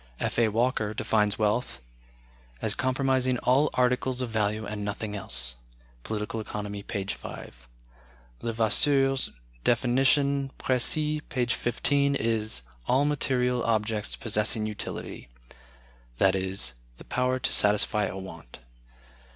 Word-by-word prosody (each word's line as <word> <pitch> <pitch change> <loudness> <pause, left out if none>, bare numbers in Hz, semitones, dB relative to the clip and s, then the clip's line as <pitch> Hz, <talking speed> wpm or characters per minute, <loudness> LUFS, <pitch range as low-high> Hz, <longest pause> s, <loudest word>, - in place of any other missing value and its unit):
F. - - -1
A. 115 - +5
Walker 110 -1 0
defines 105 -2 +1
wealth 105 - 0 0.8
as 105 - 0
comprising 130 0 +1
"all 135 +5 +3
articles 125 0 +1
of 125 -3 -2
value 110 0 0
and 105 0 -4
nothing 105 +1 -4
else" 60 -9 -4 0.5
("Political 110 +1 -3
Economy," 105 -1 -5
p. 100 -1 -4
5). - - -7 0.7
Levasseur's 135 +4 +3 0.3
definition 135 +3 +3
("Précis," 150 +4 +1
p. 125 -3 0
15) 140 +4 +2
is, 110 - -1 0.2
"all 135 +3 +3
material 125 -4 +1
objects 110 -1 0
possessing 110 0 0
utility" 105 - -6 0.9
(i.e., 95 0 +2 0.4
the - - -12
power 125 +1 +1
to 130 - 0
satisfy 105 0 +3
a 95 - -4
want). 85 -9 -10
115 Hz, 110 wpm, -27 LUFS, 105-130 Hz, 0.9 s, A